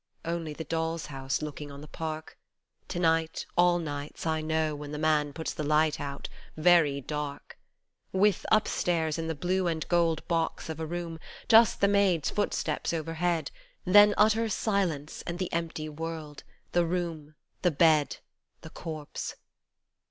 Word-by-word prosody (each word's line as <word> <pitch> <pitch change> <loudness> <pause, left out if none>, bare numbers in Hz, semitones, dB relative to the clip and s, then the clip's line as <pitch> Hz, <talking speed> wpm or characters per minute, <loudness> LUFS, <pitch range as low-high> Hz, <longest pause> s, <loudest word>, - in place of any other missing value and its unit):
Only 165 -2 -3
the 160 - -6
doll's 165 +1 -2
house 135 +2 -2
looking 150 -1 -6
on 140 0 -9
the 150 - -10
Park 155 0 -5 0.5
To - - -4
night, 165 -1 +1
all 175 0 +5
nights, 145 -3 -5
I 160 -1 0
know, 155 0 0
when 145 0 -7
the 150 - -4
man 150 -1 +2
puts 160 +3 -4
the - - -5
lights 150 +1 +2
out, 140 -1 -5 0.3
very 155 -4 +4
dark. 145 +1 -5 0.5
With, 195 0 +3
upstairs, 170 -6 +1
in 165 - -3
the 160 - -2
blue 180 +5 0
and 160 -2 -2
gold 170 -2 +2
box 165 -1 -1
of 160 0 -5
a 160 - -3
room, 170 -1 -4 0.3
just 225 -1 +6
the 200 - +6
maids' 195 -6 +2
footsteps 205 -4 -1
overhead, 165 0 -1 0.3
Then 205 +2 +7
utter 220 +2 +4
silence 185 -9 -1
and 170 0 -3
the 185 -1 -3
empty 165 -2 -2
world 155 -1 -6 0.3
the 175 - +3
room 165 -3 -3 0.3
the 180 - +4
bed 155 -2 +3 0.4
The - - -11
corpse 155 -3 -6
160 Hz, 155 wpm, -29 LUFS, 150-175 Hz, 0.5 s, Then